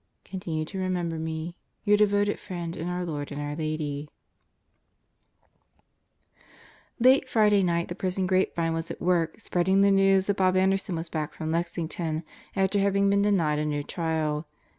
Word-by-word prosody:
Continue 170 -5 -4
to 190 +4 -6
remember 175 -3 -1
me. 160 +1 -4 0.3
Your 210 -1 +4
devoted 205 0 +2
friend 170 -3 -5
in 165 +1 -4
our 180 0 -2
Lord 145 -4 -4
and 145 - -5
our 145 0 -3
Lady... 155 -2 -3 2.9
Late 260 +2 +5
Friday 210 -3 +4
night 170 -2 +1
the - - -4
prison 185 0 -1
grapevine 180 -3 +1
was 165 +1 -3
at - - -6
work 170 -1 +1
spreading 190 -1 +2
the 200 0 +5
news 195 -1 +4
that 200 0 0
Bob 185 -1 +3
Anderson 190 -1 +1
was 165 +1 -4
back 155 -2 -4
from 160 0 -3
Lexington 165 -1 -2 0.3
after 195 +1 +2
having 200 0 +2
been 200 0 +3
denied 170 -8 +2
a 150 - -1
new 145 -1 -1
trial. 160 -2 -2
175 Hz, 160 wpm, -27 LUFS, 160-195 Hz, 2.9 s, Late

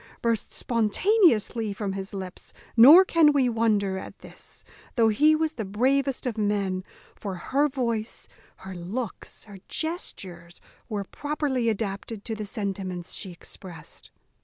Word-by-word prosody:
burst 230 -2 0
spontaneously 230 - +2
from 200 -1 -3
his 195 0 -5
lips; 190 -2 -8 0.2
nor 295 +11 +10
can 325 -4 +5
we 275 -3 +3
wonder 210 -5 +1
at - - -10
this, - - -11 0.3
though 230 -3 +4
he 300 +9 +4
was 315 0 0
the 235 -8 -5
bravest 260 +7 0
of 230 -3 -2
men; 200 -3 0 0.3
for 195 -3 -5
her 275 +11 +1
voice, 235 -5 -3 0.3
her 190 0 -9
looks, 190 +6 -6
her 200 -3 -12
gestures, 185 - -5 0.3
were 210 -3 -2
properly 280 0 -1
adapted 210 0 -4
to 225 - -3
the 215 -1 -4
sentiments 195 -4 -4
she 190 - -5
exprest. 170 -2 -10
220 Hz, 135 wpm, -26 LUFS, 195-260 Hz, 0.3 s, nor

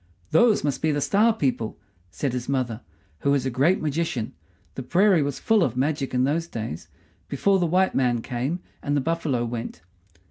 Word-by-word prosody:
"Those 215 +7 +4
must 145 -2 -1
be 155 - +2
the 145 - 0
Star 210 +10 +3
people," 130 - -2 0.3
said 130 +7 -3
his 125 0 -4
mother, 125 -4 -1 0.4
who - - 0
was 140 -2 +2
a 130 - -1
great 145 +10 +2
magician 150 -6 -2 0.4
the - - -5
prairie 185 +5 +3
was 140 -2 -2
full 220 -2 +2
of 125 - -1
magic 140 0 0
in 125 - +3
those 160 +5 0
days, 110 - -6 0.4
before 195 +8 +2
the 175 - +1
white 185 +3 +2
man 120 -3 +1
came 130 +9 -3 0.2
and 145 0 0
the - - +1
buffalo 155 -6 -1
went. 115 -8 -6
140 Hz, 185 wpm, -24 LUFS, 125-170 Hz, 0.4 s, Those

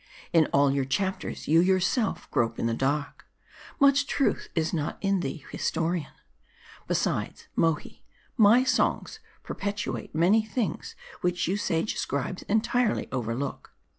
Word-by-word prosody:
In 160 -2 +5
all 140 0 +3
your 140 -1 +1
chapters, 190 +9 -2
you 160 +2 +5
yourself 190 +5 +1
grope 115 -1 0
in - - -2
the 115 - +1
dark. 140 +4 -2 0.5
Much 280 0 +4
truth 275 - 0
is 160 0 0
not 155 -3 -2
in 195 -1 +1
thee, 140 -2 -5
historian. 165 -2 -1 0.8
Besides, - - -1
Mohi: 165 -2 0 0.3
my 230 +2 +6
songs 350 +10 0 0.2
perpetuate 205 -5 -4
many 190 +7 +4
things 215 -5 -3 0.3
which 180 -1 0
you 185 - +1
sage 170 -2 -1
scribes 140 +6 -2
entirely 230 +2 +1
overlook. 125 +2 -4
175 Hz, 130 wpm, -27 LUFS, 145-210 Hz, 0.8 s, my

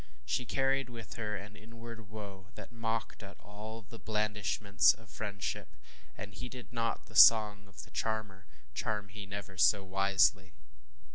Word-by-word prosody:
She 105 - 0
carried 135 -1 +1
with 115 -2 -8
her 105 -2 -3
an 105 +1 -8
inward 115 -1 -11
woe 100 -3 -9
that - - -10
mocked 115 -1 -3
at 100 -1 -11
all 110 +2 -9
the 115 +2 -12
blandishments 105 -2 +2
of 115 -1 -17
friendship, 100 -2 -4 0.4
and 105 +1 -7
ŌĆ£heeded 125 +2 -8
not 115 -2 -1
the - - -17
song 105 -1 +7
of 100 - -11
the - - -15
charmer, 105 -3 -3 0.3
charm 105 -2 -2
he 100 0 -8
never 100 -2 -7
so 100 +1 +5
wisely. 95 -1 +2
105 Hz, 150 wpm, -33 LUFS, 100-115 Hz, 0.4 s, song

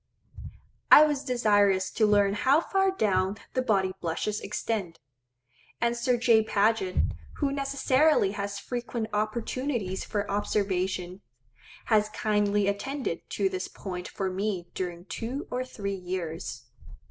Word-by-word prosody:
I 305 - +10
was 295 -2 -1
desirous 205 -6 +2
to 215 - +2
learn 205 -1 +4
how 265 +8 +3
far 385 +3 +1
down 195 - +1 0.2
the 255 - +1
body 195 -6 +1
blushes 190 +5 -2
extend; 195 -7 -3 0.8
and 235 0 +1
Sir 240 +1 +1
J. 230 -2 +5
Paget, 210 -3 +1 0.4
who 285 -2 -1
necessarily 275 -3 +2
has 200 0 -4
frequent 235 0 -4
opportunities 215 -1 -2
for 205 -1 -2
observation, 190 -2 -1 0.6
has 215 -2 +3
kindly 210 -1 +1
attended 250 0 -3
to 200 - 0
this 185 -1 -3
point 180 -2 -6
for 190 -1 -3
me 190 -2 -3
during 175 -1 -4
two 245 +7 -5
or 250 +1 -1
three 200 -6 -5
years. 180 -3 -5
210 Hz, 125 wpm, -28 LUFS, 190-240 Hz, 0.8 s, I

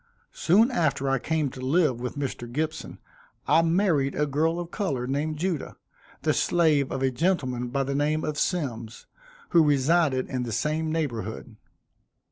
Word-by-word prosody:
Soon 220 +9 +3
after 140 - 0
I 135 -1 +1
came 155 0 -1
to 130 - -9
live 135 -2 +1
with 125 +3 -4
Mr. 125 -4 -4
Gibson, 155 +4 -3 0.5
I 165 - +5
married 165 -5 +1
a 150 - +1
girl 160 +4 0
of 175 0 -6
color 140 - -2
named 145 +4 -2
Judah, 170 -3 -3 0.5
the - - +2
slave 155 -6 +2
of 130 - -2
a 130 - +2
gentleman 130 -5 0
by 135 +3 -1
the 140 +1 -3
name 150 +2 0
of 150 -1 -2
Symmes, 120 -11 -3 0.4
who 170 -2 +5
resided 145 -1 +2
in 130 -1 -3
the 120 -2 -4
same 155 +7 -1
neighborhood. 120 - -4
145 Hz, 160 wpm, -26 LUFS, 130-165 Hz, 0.5 s, I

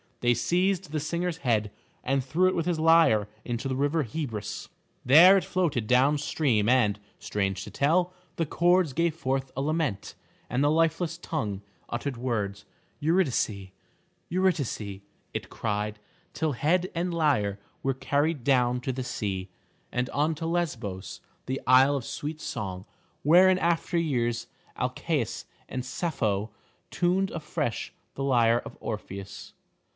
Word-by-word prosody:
They 120 0 +4
seized 185 +1 0
the 155 - -1
singer's 170 +3 -2
head 110 -7 0 0.3
and 135 +1 +1
threw 165 +8 +2
it 185 - +1
with 170 0 -1
his 170 -3 0
lyre 160 -11 +5 0.2
into 120 +2 -3
the 130 - -1
river 145 +4 +1
Hebrus. 115 -5 -5 0.4
There 165 +9 +9
it 190 - 0
floated 155 -12 0
down 130 +5 +4
stream 120 -8 +1
and, 105 -5 +3 0.2
strange 100 -2 -2
to - - -9
tell, 175 +5 +2 0.2
the 165 - 0
chords 175 -1 +3
gave 170 +1 +1
forth 135 -4 -2
a 135 - -1
lament, 150 -8 -1 0.4
and 125 +4 +1
the 145 - +4
lifeless 165 +1 +1
tongue 110 - -3 0.3
uttered 130 +2 -3
words. 105 -5 -2 0.3
"Eurydice, 140 - +1 0.6
Eurydice," 140 - -1 0.3
it - - -4
cried, 105 -1 -3 0.3
till 160 -1 0
head 175 +9 +1
and 175 +1 -1
lyre 125 -12 +1 0.2
were 135 - +1
carried 145 +1 0
down 125 -2 +3
to 130 - -2
the 130 0 -4
sea, 100 -6 -3 0.4
and 125 +1 -1
on 150 +3 +1
to 165 - -5
Lesbos, 120 - -3 0.3
the 130 +1 -2
isle 130 +3 +6
of 130 -4 -3
sweet 155 +1 -5
song, 95 -2 -5 0.4
where 175 +5 +7
in 185 0 +3
after 170 +1 +1
years 120 -8 0 0.3
Alcaeus - - -2 0.2
and 130 -1 -4
Sappho 115 - -1 0.4
tuned 185 +2 +1
afresh 150 -6 -3 0.2
the 135 - -3
lyre 120 -3 +3
of - - -9
Orpheus. 100 -3 -7
135 Hz, 145 wpm, -27 LUFS, 115-165 Hz, 0.6 s, There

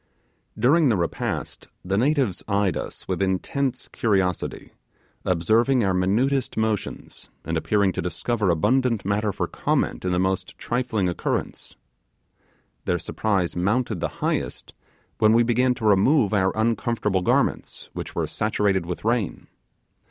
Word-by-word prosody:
During 145 +4 +4
the 110 - +2
repast, 85 -1 -3 0.2
the 95 +2 0
natives 130 - +1
eyed 100 -2 +1
us - - -6
with - - -2
intense 110 +8 -1
curiosity, 95 -6 -1 0.5
observing 110 +9 +2
our 95 -2 +2
minutest 115 +9 +1
motions, 110 -2 -3 0.2
and 80 - -2
appearing 100 +4 +2
to - - -3
discover 105 +4 -1
abundant 115 +6 +2
matter 105 +1 0
for - - -2
comment - - -1
in 90 - 0
the 90 - +1
most 95 +1 -1
trifling 115 -5 -1
occurrence. 90 - -3 1.1
Their 90 - +1
surprise 95 0 -1
mounted 105 +3 0
the - - 0 0.2
highest, - - -2 0.5
when 110 0 +5
we 120 +1 +5
began 125 +2 +2
to 115 - -5
remove 105 +3 +4
our 95 -2 +3
uncomfortable 110 -3 0
garments, 90 - 0
which - - -6
were - - 0
saturated 100 -4 0
with 90 +3 -5
rain. 115 -5 -1
105 Hz, 135 wpm, -24 LUFS, 95-120 Hz, 1.1 s, when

